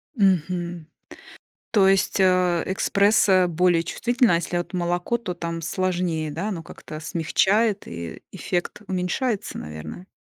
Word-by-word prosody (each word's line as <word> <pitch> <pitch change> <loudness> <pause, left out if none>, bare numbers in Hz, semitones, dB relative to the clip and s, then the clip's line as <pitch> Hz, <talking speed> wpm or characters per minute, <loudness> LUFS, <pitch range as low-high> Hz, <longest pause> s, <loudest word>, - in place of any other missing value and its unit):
Мгм. 175 - 0 0.8
То 200 -4 +4
есть, 195 +1 +2
э, 180 -2 +3
эспрессо 195 -1 +3
более 175 0 +2
чувствительная, 240 - +2
а - - +4
если 175 +1 -2
от 175 - -3
молоко, 175 +5 0
то 195 -6 -5
там 170 -1 -4
сложнее, 175 -3 -1
да? 170 +8 -3
Оно 175 -6 -4
как-то 155 -1 -10
смягчает 195 +6 +1
и 85 -1 -7
эффект 175 +3 -3
уменьшается, 190 +5 -2
наверное? 75 - -8
180 Hz, 130 wpm, -24 LUFS, 170-195 Hz, 0.8 s, То